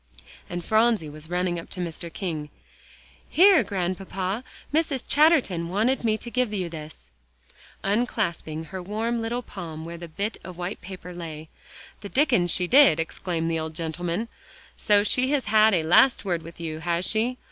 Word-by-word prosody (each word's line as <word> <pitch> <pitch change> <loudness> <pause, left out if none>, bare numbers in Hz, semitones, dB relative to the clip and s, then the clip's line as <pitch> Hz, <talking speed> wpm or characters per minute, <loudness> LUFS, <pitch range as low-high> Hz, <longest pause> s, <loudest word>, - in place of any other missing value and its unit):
And 175 -1 -5
Phronsie 220 -8 +2
was 155 +2 -12
running 180 -1 0
up 165 - -10
to 185 - -7
Mr. 170 -1 -5
King: 160 -6 -4 0.8
"Here, 375 -2 +6
Grandpapa, 190 +2 -3 0.3
Mrs. 300 -5 +1
Chatterton 275 - +3
wanted 225 +8 +1
me 220 -2 +2
to 235 - -8
give 250 -3 0
you 185 -5 -2
this," 155 - -10 0.7
unclasping 195 -7 -1
her 190 +2 -5
warm 225 +5 -2
little 240 +2 -2
palm 160 -6 -7
where 170 +1 -7
the 170 - -7
bit 200 +7 -3
of 185 -2 -9
white 180 +3 -5
paper 180 -1 -9
lay. 160 -3 -8 0.5
"The 200 - -8
Dickens 245 - +3
she 180 +1 +3
did," 205 - +6
exclaimed 165 0 -2
the 165 - 0
old 160 0 -5
gentleman; 170 +6 -3 0.5
"so 205 -1 +3
she 250 +5 +2
has 280 -3 +1
had 215 -1 +5
a 165 - +1
last 200 +9 +4
word 175 -3 -1
with 165 +1 -12
you, 160 -2 -4
has 170 +2 -1
she? 230 +5 +1
185 Hz, 170 wpm, -25 LUFS, 170-225 Hz, 0.8 s, Here